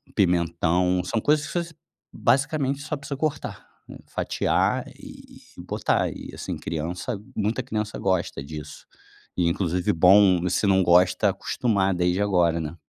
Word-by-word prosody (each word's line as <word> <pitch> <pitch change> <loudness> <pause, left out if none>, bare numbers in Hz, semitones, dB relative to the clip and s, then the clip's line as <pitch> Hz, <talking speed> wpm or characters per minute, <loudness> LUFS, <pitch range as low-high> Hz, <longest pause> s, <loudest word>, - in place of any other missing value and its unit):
pimentão, 90 -1 +1
são 115 - -1
coisas 145 +5 +2
que - - -8
você 165 -1 -10 0.4
basicamente 140 0 +1
só 150 +1 -4
precisa 140 -1 -6
cortar, 150 -1 -3 0.4
fatiar - - 0
e - - -13 0.2
e - - -8
botar, - - 0
e - - -9
assim, - - -5
criança 90 +8 -4 0.2
muita 110 +4 -1
criança 110 -3 -3
gosta 95 -7 -1
disso. 75 0 -9 0.5
E 90 -2 +2
inclusive 90 0 0
bom, 90 +1 +5
se 90 +4 0
não 95 -1 +4
gosta, 90 +1 +4
acostumar 100 -5 0
desde 90 +2 0
agora, 90 -5 +2
né? 75 +1 -5
95 Hz, 140 wpm, -24 LUFS, 85-115 Hz, 0.5 s, bom